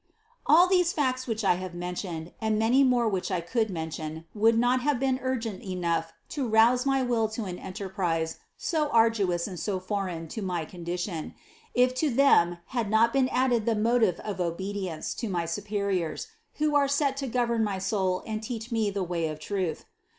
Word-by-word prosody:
All 345 +4 +7
these 360 -2 +3
facts 255 -3 0
which 225 -1 -2
I 185 -3 +3
have 185 -2 -6
mentioned, 175 -2 -5
and 220 -1 +1
many 235 +5 +4
more 245 -3 +3
which 195 -2 -1
I 185 -3 0
could 220 +6 -1
mention, 160 -2 -5
would 225 +2 +3
not 245 +2 +3
have 285 -1 +1
been 260 -1 +1
urgent 230 -6 -2
enough 170 -3 -2 0.2
to 275 -4 -2
rouse 235 +4 +4
my 270 -1 +2
will 230 -3 +1
to 220 0 -4
an 180 -2 -5
enterprise 180 -4 -3 0.2
so 310 -3 0
arduous 215 -8 +2
and 185 -4 -6
so 190 +3 -2
foreign 185 -4 -3
to 220 - -5
my 180 -4 -2
condition, 175 0 -5 0.4
if 250 +1 +4
to 310 - +2
them 230 -10 +4 0.2
had 235 -5 -1
not 225 +2 +4
been 265 -1 +3
added 245 -4 +1
the 230 - +3
motive 220 -4 +2
of 200 -3 -4
obedience 185 -1 -3
to 230 - -4
my 175 -3 -1
superiors, 200 -2 -2 0.3
who 300 -1 +1
are 285 -1 +4
set 280 -1 +1
to 275 -1 -3
govern 235 -2 +1
my 205 -3 -1
soul 190 -1 0
and 220 -1 -3
teach 225 +1 -6
me 220 -2 +1
the 200 -1 -2
way 170 -2 -1
of 155 -1 -5
truth. 180 -1 -3
210 Hz, 185 wpm, -27 LUFS, 180-245 Hz, 0.4 s, All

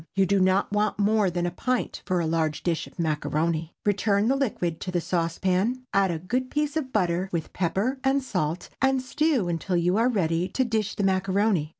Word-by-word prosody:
You 195 0 +4
do 200 +1 +2
not 190 +2 +2
want 210 0 +1
more 210 -1 +3
than 175 0 -2
a 175 - -1
pint 250 +7 -2
for 185 -2 +1
a 170 - 0
large 160 -1 -1
dish 170 -2 -1
of - - -18
macaroni. 160 0 -1
Return 205 +1 +2
the 270 - +3
liquid 180 - -1
to - - -4
the 180 -1 0
saucepan, 185 +8 0
add 195 -1 +3
a 170 - -1
good 250 +10 -2
piece 295 0 -1
of 280 -5 -2
butter, 185 -3 0
with 165 -3 -3
pepper 195 +9 -1
and 270 0 +2
salt, 175 -7 -2
and 270 0 +3
stew 265 - 0
until 175 +2 -1
you 175 +3 +2
are 235 +3 +3
ready 175 -6 0
to 260 +7 0
dish 220 -3 -1
the 205 - -1
macaroni. 190 -3 +1
190 Hz, 205 wpm, -26 LUFS, 170-225 Hz, -, You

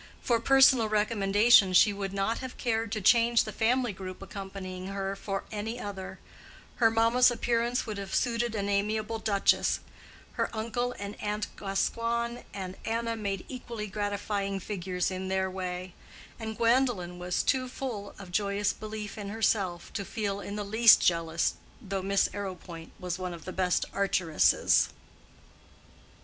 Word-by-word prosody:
For 235 -2 +1
personal 265 -2 +5
recommendation 210 -1 +4
she 205 +3 +6
would 200 -1 -4
not 195 +3 -1
have 260 -1 -7
cared 225 -3 -1
to 215 - -2
change 235 +3 +5
the 215 - -6
family 240 +1 +1
group 185 -1 -8
accompanying 190 -2 -7
her 195 0 -3
for 195 0 -4
any 220 +3 -4
other: 195 -4 -6 0.6
her 225 -2 +5
mamma's 230 +3 +4
appearance 240 0 0
would 215 -3 -5
have 195 -1 -4
suited 235 -1 0
an 200 -1 -1
amiable 215 +2 0
duchess; 200 -3 +2 0.5
her - - -1
uncle 240 +3 -2
and 200 +1 -7
aunt 210 0 -3
Gascoigne 235 +4 -1 0.2
with 185 -1 -6
Anna 230 0 -1
made 200 -3 -3
equally 240 -4 -6
gratifying 205 -1 -2
figures 180 -2 -2
in 185 0 -4
their 190 0 0
way; 185 -1 -5 0.5
and 220 -1 -5
Gwendolen 230 -7 +1
was 180 0 -1
too 255 -1 +1
full 230 -6 -5
of 190 -3 -10
joyous 200 +1 0
belief 215 0 -7
in 200 -1 -5
herself 200 -5 0
to 200 - -2
feel 200 -1 -3
in 200 - -6
the 210 -1 -3
least 220 +2 +7
jealous 165 -1 +1 0.3
though 195 -1 -4
Miss 195 +1 +2
Arrowpoint 180 -4 -7
was 180 -1 -4
one 180 -1 -4
of 165 - -13
the 185 - -6
best 180 -2 +1
archeresses. 185 -5 +3
205 Hz, 150 wpm, -29 LUFS, 190-230 Hz, 0.6 s, least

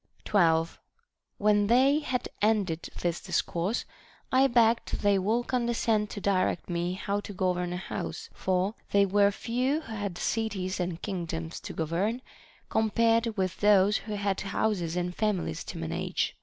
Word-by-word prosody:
12. 165 -5 +2 0.6
When 205 0 +3
they 265 +6 +5
had 255 -5 -2
ended 205 -6 +1
this 175 -1 -1
discourse, 180 +8 -1 0.5
I 265 +1 +5
begged 235 -2 +2
they 200 -1 +4
would 225 +6 0
condescend 235 -4 0
to - - -6
direct 190 -3 0
me 175 +1 -1
how 200 +2 -2
to 205 - -8
govern 180 -2 0
a 180 - -2
house; 180 - -5
for 185 +2 0 0.2
they 200 0 +4
were 200 +1 +4
few 250 +8 -1
who 230 - -9
had 205 -5 -4
cities 200 -5 -2
and 175 -2 -2
kingdoms 165 -4 -4
to - - -8
govern, 190 - -1 0.4
compared 225 +1 +2
with 185 -1 -1
those 205 0 +5
who 215 -1 -5
had 200 -1 -1
houses 195 -4 -1
and 180 0 -1
families 200 - -1
to - - -7
man 80 0 -4
age. - - -1
200 Hz, 155 wpm, -28 LUFS, 180-225 Hz, 0.6 s, they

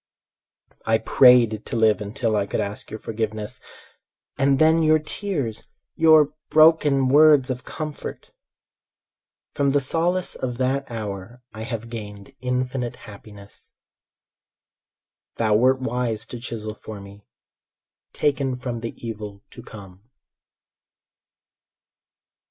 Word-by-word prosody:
I 110 0 +4
prayed 120 -3 +5
to - - -6
live 110 -2 +3
until 110 +2 -2
I 100 -1 0
could - - -2
ask 100 +1 -4
your 110 - -7
forgiveness— 110 -1 -4 0.8
And 135 0 +2
then 160 +2 +4
your 155 0 +4
tears, 155 - -4 0.3
your 155 -2 +5 0.2
broken 155 -4 +5
words 145 -2 +5
of 125 0 -6
comfort! 155 -1 -7 1.2
From 140 -1 +1
the 145 +1 +3
solace 170 +6 -1
of 125 -2 -4
that 135 +2 -1
hour 110 +1 -7
I 110 - -8
have 115 0 -6
gained 105 -3 -8
infinite 125 -1 -2
happiness. 100 -1 -13 1.7
Thou 110 -2 +1
wert 130 +4 +3
wise 120 -3 -2
to 120 - -8
chisel 110 -3 -6
for 110 -1 -10
me: 100 +1 -14 0.8
"Taken 140 -3 0
from 125 -2 -5
the 115 0 -6
evil 105 -2 -7
to - - -11
come." 100 +1 -13
120 Hz, 115 wpm, -23 LUFS, 110-140 Hz, 1.7 s, prayed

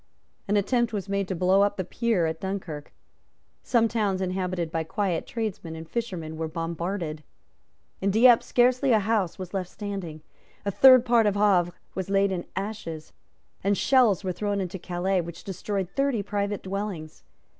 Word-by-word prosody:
An 205 +1 +2
attempt 235 +3 +1
was 200 -2 -3
made 200 -1 -1
to 190 - -2
blow 185 +3 +3
up 205 0 +2
the 185 - -1
pier 220 -1 0
at 160 0 -3
Dunkirk. 185 -6 -5 0.7
Some 230 -2 +2
towns 210 -4 0
inhabited 185 -3 -2
by 165 -1 -1
quiet 175 +1 -2
tradesmen 210 -8 -4
and 160 0 -8
fishermen 175 -8 -4
were 160 0 -2
bombarded. 165 0 -4 0.8
In 195 - +1
Dieppe 230 +3 +6
scarcely 250 +1 +3
a 220 - +5
house 205 -4 0
was 185 0 -7
left 185 -2 -2
standing; 190 -7 -6 0.4
a 200 - 0
third 255 +3 +7
part 235 -2 +4
of 205 - +1
Havre 190 -4 +3 0.2
was 190 0 -4
laid 195 0 +3
in 180 -2 -3
ashes; 190 -6 -5 0.5
and 200 +1 +2
shells 245 -8 +4
were 185 -1 -1
thrown 205 +2 -1
into 190 0 -4
Calais 180 +2 0
which 170 0 -9
destroyed 195 0 -3
thirty 275 -6 0
private 205 0 -2
dwellings. 190 -5 -5
195 Hz, 165 wpm, -26 LUFS, 175-210 Hz, 0.8 s, third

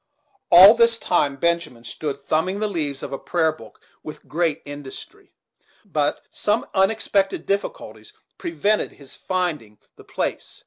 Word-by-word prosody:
All 185 +5 +10
this 230 0 +4
time 145 -9 +1
Benjamin 170 -5 -1
stood 140 +3 -5
thumbing 160 +7 -1
the 215 - 0
leaves 150 -8 -3
of - - -6
a 135 - -4
prayer 160 -2 +1
book 155 - -15 0.2
with 155 - -10
great 160 -1 -1
industry; 145 -2 -10 0.5
but - - -1
some 210 +2 0
unexpected 195 0 +1
difficulties 200 - -4 0.3
prevented 215 - 0
his 140 -2 -13
finding 165 - -3 0.2
the - - -14
place. - - -4
170 Hz, 135 wpm, -22 LUFS, 145-200 Hz, 0.5 s, All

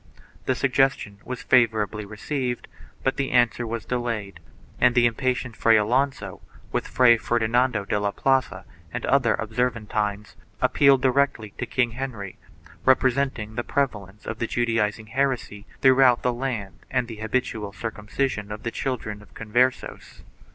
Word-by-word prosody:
The 130 - +2
suggestion 125 -6 +1
was 125 -1 -6
favorably 110 -4 +2
received 125 +4 -4 0.4
but 135 - 0
the 135 -1 -1
answer 120 -1 +2
was 115 -1 -4
delayed, 115 -5 -3 0.4
and 125 -1 +4
the 120 -1 +5
impatient 125 0 -1
Fray 115 0 +4
Alonso, 125 +6 0 0.3
with - - -2
Fray 120 -2 +5
Fernando 120 -1 +1
de 105 - 0
la 100 0 0
Plaza 120 -5 0 0.3
and - - -4
other 130 -4 +3
Observantines, 110 -3 -2 0.2
appealed 140 -2 +4
directly 130 -5 +1
to - - -2
King 120 -3 +1
Henry, 115 -6 -6 0.4
representing 130 -4 +2
the 120 - -2
prevalence 105 -9 -2
of 110 - -5
the 115 - -1
Judaizing 115 -2 0
heresy 130 -6 -1
throughout 130 -2 +5
the 125 - +1
land 120 -6 -4
and 120 - 0
the 115 -2 -8
habitual 110 -2 -2
circumcision 105 0 -3
of 105 - -7
the 115 - -2
children 110 -6 -4
of 105 - -19
Con 110 -2 -9
versos. 125 +3 0
120 Hz, 145 wpm, -24 LUFS, 105-130 Hz, 0.4 s, the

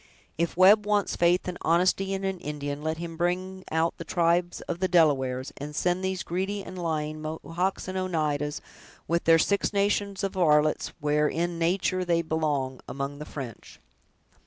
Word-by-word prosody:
If 170 +1 -1
Webb 205 +3 +6
wants 205 -1 +1
faith 175 +2 +2
and 180 -1 -4
honesty 185 +3 +2
in 195 0 -2
an 190 -1 -2
Indian, 145 -2 -4
let 160 +1 -2
him 165 0 -6
bring 185 +2 -2
out 160 +1 +1
the - - -4
tribes 170 +1 +1
of 175 - -5
the 185 - +1
Delawares, 135 -7 +2
and 150 +1 -7
send 180 +3 0
these 190 -1 -1
greedy 195 +3 -2
and 185 - -9
lying 155 -3 -2
Mohawks 165 +5 -3
and 185 - -4
Oneidas, 155 -5 -1 0.5
with 170 +1 0
their 165 0 +7
six 200 +5 +1
nations 200 -1 0
of 195 - -1
varlets, 155 -4 +2
where 150 0 +2
in 170 +2 -2
nature 185 +2 +1
they 170 -1 +1
belong, 150 -5 -1
among 140 +1 -4
the 150 - -6
French!" 130 -8 -8
170 Hz, 170 wpm, -27 LUFS, 150-185 Hz, 0.5 s, their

